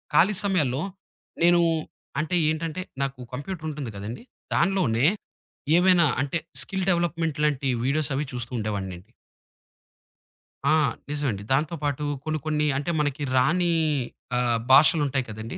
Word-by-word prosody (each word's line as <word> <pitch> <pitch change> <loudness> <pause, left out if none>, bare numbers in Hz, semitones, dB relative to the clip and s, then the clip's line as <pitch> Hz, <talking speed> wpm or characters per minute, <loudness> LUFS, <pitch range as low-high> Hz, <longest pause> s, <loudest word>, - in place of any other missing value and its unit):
ఖాళీ 195 +7 +5
సమయాల్లో 150 -9 +1 0.6
నేను, 175 0 +6 0.6
అంటే 160 +4 -1
ఏంటంటే, 160 +2 -2 0.2
నాకు 135 -1 -4
కంప్యూటర్ 155 +4 -5
ఉంటుంది 140 -6 -5
కదండీ! 110 - -6 0.3
దాంట్లోనే 170 -10 +2 0.7
ఏమైనా, 180 -1 +5 0.2
అంటే 145 +3 -1 0.2
స్కిల్ 190 +6 -2
డెవలప్‌మెంట్ 165 -3 0
లాంటి 140 -2 0 0.2
వీడియోస్ 145 +3 +1
అవి 145 +3 -1
చూస్తూ 120 -1 -4
ఉండేవాన్నండి. 100 -2 -4 1.6
ఆ! - - +5 0.3
నిజమండి. 140 -9 -2
దాంతో 150 +5 +1
పాటు, 145 0 -1 0.2
కొన్ని 155 0 -1
కొన్ని, 150 -1 +1
అంటే 145 +5 -1
మనకి 145 -1 -1
రాని 175 +6 +3 0.7
ఆహ్, 120 -1 +2
భాషలుంటాయి 140 -2 +5
కదండీ! 110 +2 -6
145 Hz, 120 wpm, -25 LUFS, 125-170 Hz, 1.6 s, నేను